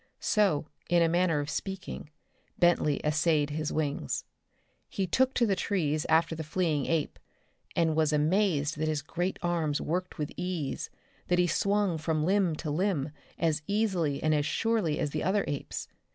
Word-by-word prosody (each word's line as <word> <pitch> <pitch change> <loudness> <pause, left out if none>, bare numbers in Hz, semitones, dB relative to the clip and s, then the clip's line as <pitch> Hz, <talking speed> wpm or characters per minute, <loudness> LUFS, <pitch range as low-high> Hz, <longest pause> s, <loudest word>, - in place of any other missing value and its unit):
So, 195 -9 +2 0.2
in 170 0 +5
a - - +4
manner 170 -2 +2
of 145 - -5
speaking, 190 -5 -5 0.5
Bentley 175 -4 +3
essayed 150 -1 +2
his 155 0 -2
wings. 145 - -2 0.6
He 195 - -1
took 260 +8 +2
to 240 - +4
the 200 -3 +2
trees 155 -7 0
after 165 +1 +3
the 160 0 -4
fleeing 155 -3 0
ape, 165 -3 -1 0.6
and 165 -2 +2
was 155 -1 +3
amazed 155 -1 +1
that 155 - 0
his 155 -3 -1
great 175 +5 -2
arms 165 -4 0
worked 180 +3 -3
with 150 -2 -3
ease, 180 -6 -3 0.4
that 180 - +2
he 180 - +4
swung 200 0 +1
from 155 -1 0
limb 190 -3 +2
to 155 -1 -4
limb 160 -3 0 0.3
as 160 -2 +1
easily 190 -9 0
and 155 0 +3
as 150 0 +1
surely 215 -6 +1
as 145 - -1
the 155 - -2
other 200 +2 +1
apes. 145 - -4
165 Hz, 165 wpm, -29 LUFS, 150-185 Hz, 0.6 s, in